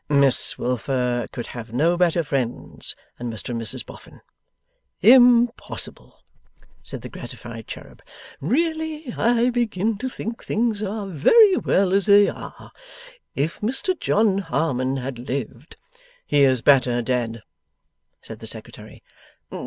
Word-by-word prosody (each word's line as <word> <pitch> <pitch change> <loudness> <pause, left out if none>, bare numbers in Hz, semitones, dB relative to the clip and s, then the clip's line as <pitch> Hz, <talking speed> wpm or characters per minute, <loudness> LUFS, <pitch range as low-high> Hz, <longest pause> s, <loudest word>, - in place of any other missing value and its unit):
'Miss 140 -2 +3
Wilfer 125 0 -1
could 120 - -6
have 115 -2 -8
no 160 +9 +2
better 175 -1 +2
friends 130 -5 -3 0.2
than 120 -1 -4
Mr 110 - -6
and 115 -1 -3
Mrs 115 - -2
Boffin.' - - -14 0.8
'Impossible!' 245 +1 +3 0.6
said - - -7
the - - -6
gratified - - -9
cherub. - - -10 0.4
'Really 315 -2 -1
I 240 +1 +2
begin 220 -3 -1
to 260 - -3
think 230 -1 -6
things 220 -2 -1
are 210 0 -3
very 370 - +5
well 190 -1 +1
as 200 +1 +2
they 205 0 +7
are. - - -8 0.6
If 150 +4 -2
Mr 265 - 0
John 205 -2 +2
Harmon 135 -6 -1
had 130 -1 -5
lived 130 +2 -5 0.3
' - - -31
'He 145 - +2
is 130 -3 +2
better 125 -4 +4
dead,' 115 -2 -2 0.8
said - - -10
the - - -9
Secretary. - - -9
170 Hz, 130 wpm, -22 LUFS, -, 0.8 s, they